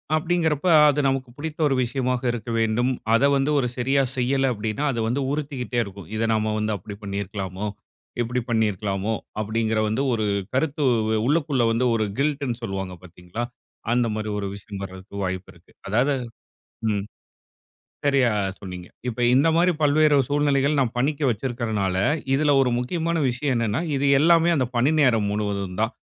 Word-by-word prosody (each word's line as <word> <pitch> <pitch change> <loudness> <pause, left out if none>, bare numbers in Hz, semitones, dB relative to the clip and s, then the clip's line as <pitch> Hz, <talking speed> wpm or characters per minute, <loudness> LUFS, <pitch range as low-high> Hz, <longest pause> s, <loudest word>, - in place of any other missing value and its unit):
அப்படீங்கிறப்ப 160 -1 0 0.2
அது 145 +1 +1
நமக்கு 135 -1 -1
பிடித்த 155 +1 -6
ஒரு 135 - +1
விஷயமாக 125 0 -1
இருக்க 120 0 -6
வேண்டும். 115 +3 +1 0.2
அத 115 - +4
வந்து 135 +2 +1
ஒரு 125 - +1
சரியா 135 +3 +2 0.2
செய்யல 135 +1 +1
அப்டீன்னா, 110 +4 -3
அது 115 - -3
வந்து 130 +5 0
உறுத்திக்கிட்டே 140 -5 -2
இருக்கும். 100 -4 -10
"இத 110 - -2
நம்ம 110 0 0
வந்து 110 0 -1
அப்படி 100 +3 -9
பண்ணியிருக்கலாமோ? 100 0 -4 0.5
இப்படி 120 +1 -1
பண்ணியிருக்கலாமோ?" 105 -2 0 0.3
அப்படீங்கிற 110 +1 0
வந்து 110 +6 0
ஒரு 110 -2 0 0.3
கருத்து 145 +1 0 0.3
உ - - +1 0.2
உள்ளுக்குள்ள 145 -5 +1
வந்து 115 +3 +1
ஒரு 110 -1 +1
கில்ட்டுன்னு 140 -4 -1
சொல்லுவாங்க 95 -3 -4
பார்த்தீங்களா? 90 +5 -7 0.5
அந்த 120 -1 +2
மாரி 110 0 -3
ஒரு 100 - -3
விஷயம் 100 -1 -8
வரதுக்கு 95 +1 -10
வாய்ப்பு 95 0 -3
இருக்கு. 85 +1 -23 0.2
அதாவது 125 +7 +2 0.8
ம். 100 -2 -1 1.0
சரியா 135 -4 +3 0.3
சொன்னீங்க. 90 -2 -8 0.2
இப்ப 120 0 -4
இந்த 140 +5 +4
மாரி 175 +1 +4
பல்வேறு 150 0 +4
சூழ்நிலைகள் 145 0 +2
நா 135 - +4
பணிக்கு 145 +3 0
வச்சிருக்கறனால, 110 -5 -2 0.4
இதுல 145 +1 +3
ஒரு 125 - +1
முக்கியமான 165 +6 -1
விஷயம் 130 +2 -1
என்னன்னா, 115 +3 0 0.2
இது 140 +1 +1
எல்லாமே 165 +2 +5
அந்த 130 -4 +1
பணி 125 +5 +3
நேரம் 115 -7 +3
முழுவதும் 100 -3 -3
தான். 110 +2 0
120 Hz, 155 wpm, -24 LUFS, 105-140 Hz, 1.0 s, எல்லாமே